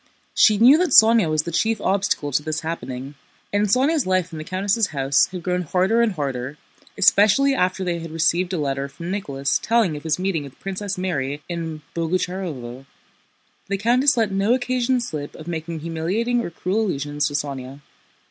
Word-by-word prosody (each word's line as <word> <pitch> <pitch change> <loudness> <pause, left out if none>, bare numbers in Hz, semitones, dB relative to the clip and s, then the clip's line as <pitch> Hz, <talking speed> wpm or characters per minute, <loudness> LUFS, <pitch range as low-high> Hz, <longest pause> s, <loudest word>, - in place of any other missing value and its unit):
She 215 -2 +5
knew 255 +8 +7
that 355 -7 +2
Sónya 220 -5 +4
was 155 0 +1
the 170 - -5
chief 220 +6 0
obstacle 190 -7 0
to 140 - +1
this 155 +1 -3
happening, 135 -4 -5 0.4
and 205 +1 +2
Sónya's 265 - +2
life 185 -2 0
in 160 - -7
the - - -5
countess' 200 +5 0
house 135 -3 +2
had 180 -2 -8
grown 180 0 -1
harder 185 +7 +1
and 230 -3 +2
harder, 135 -3 -4 0.4
especially 210 +7 +4
after 185 -5 0
they 175 -2 -2
had 165 0 -7
received 165 +3 +1
a 185 - -1
letter 140 -2 -2
from 170 +6 -7
Nicholas 140 -9 -1
telling 225 -8 +2
of 145 - -7
his 160 -1 -1
meeting 185 -4 -1
with 140 -1 -12
Princess 195 0 -4
Mary 145 -6 -3
in 165 -3 -5
Boguchárovo. 165 -7 -3 0.8
The 200 - -1
countess 245 +6 +3
let 220 -3 +1
no 200 +5 +2
occasion 255 0 0
slip 150 -10 -6
of 155 - -11
making 165 -1 -5
humiliating 185 +10 -1
or - - -4
cruel 185 +5 -2
allusions 145 -2 -1
to 145 - -5
Sónya. 140 -1 -5
180 Hz, 180 wpm, -22 LUFS, 150-205 Hz, 0.8 s, knew